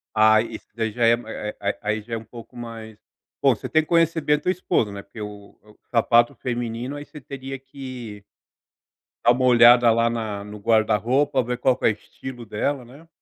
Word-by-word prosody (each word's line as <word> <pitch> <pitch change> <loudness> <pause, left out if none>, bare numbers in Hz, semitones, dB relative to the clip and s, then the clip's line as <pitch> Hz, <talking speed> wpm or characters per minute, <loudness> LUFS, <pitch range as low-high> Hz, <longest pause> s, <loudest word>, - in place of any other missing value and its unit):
Ah, 110 0 +6
isso 115 -1 -7
daí 110 -1 -1
já 120 +2 +1
é 115 - +6
a 110 -3 -4
aí 100 0 -1
aí 105 +1 -1
já 115 +2 -9
é - - -2
um 110 - -8
pouco 115 +2 -13
mais 115 -2 -8 0.4
bom, - - +4
você - - -7
tem 155 - +4
que - - -15
conhecer 165 -1 +3
bem 150 0 +3
a - - -3
tua 180 - 0
esposa, 175 - 0
né, 100 0 -7
porque 110 - -11
o 105 -1 -9
o 105 0 -21
sapato 120 0 +3
feminino, 120 +1 -4
aí 145 0 -7
você 150 - -12
teria 135 0 -7
que 130 -6 -9 1.0
dá 120 - +6
uma 130 +1 +1
olhada 120 -1 +7
lá 115 +1 +2
na 110 -3 -4
no 105 +1 -9
guarda-roupa, 115 +6 +2
ver 125 +1 -3
qual 125 +1 +2
que - - -3
é - - +7
o - - +3
estilo 120 +3 -9
dela, 125 +5 -2
né? 140 +7 -16
120 Hz, 215 wpm, -23 LUFS, 110-130 Hz, 1.0 s, olhada